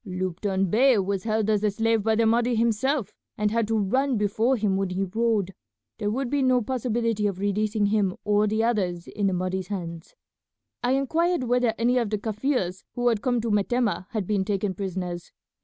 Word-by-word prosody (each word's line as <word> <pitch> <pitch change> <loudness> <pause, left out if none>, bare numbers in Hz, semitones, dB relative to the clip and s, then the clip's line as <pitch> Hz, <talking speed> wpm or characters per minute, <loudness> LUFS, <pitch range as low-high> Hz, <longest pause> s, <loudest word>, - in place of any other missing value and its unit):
Lupton 185 0 -2
Bey 255 +2 +5
was 195 0 -1
held 220 -1 0
as 210 -1 +1
a 210 - +3
slave 225 +2 +1
by 220 +1 +1
the 225 +1 +2
Mahdi 235 +2 +2
himself, 235 +3 0 0.2
and 210 -1 +1
had 230 -1 +1
to 225 0 +1
run 255 +6 +1
before 220 +5 +1
him 205 -3 +1
when 195 -1 -1
he 185 +2 -1
rode. 205 -1 0 0.5
There 205 - -1
would 255 +4 -1
be 285 +3 0
no 255 -1 +4
possibility 230 -3 -1
of 195 -3 -3
releasing 205 +2 0
him 200 -3 +1
or 210 0 +3
the 220 +2 0
others 185 -7 -1
in 205 -1 -1
the 190 - +1
Mahdi's 185 0 -2
hands. 170 -4 -6 0.7
"I 245 +1 +1
inquired 320 +4 +1
whether 245 -2 +1
any 245 +2 +2
of 230 -4 -1
the 210 - 0
Kaffirs 215 -3 -2
who 245 0 +2
had 225 -3 0
come 245 -2 +1
to 225 -1 -2
Metemmeh 210 -1 0
had 215 -4 -3
been 200 0 0
taken 200 -1 -1
prisoners. 180 -2 -5
215 Hz, 195 wpm, -25 LUFS, 195-235 Hz, 0.7 s, Bey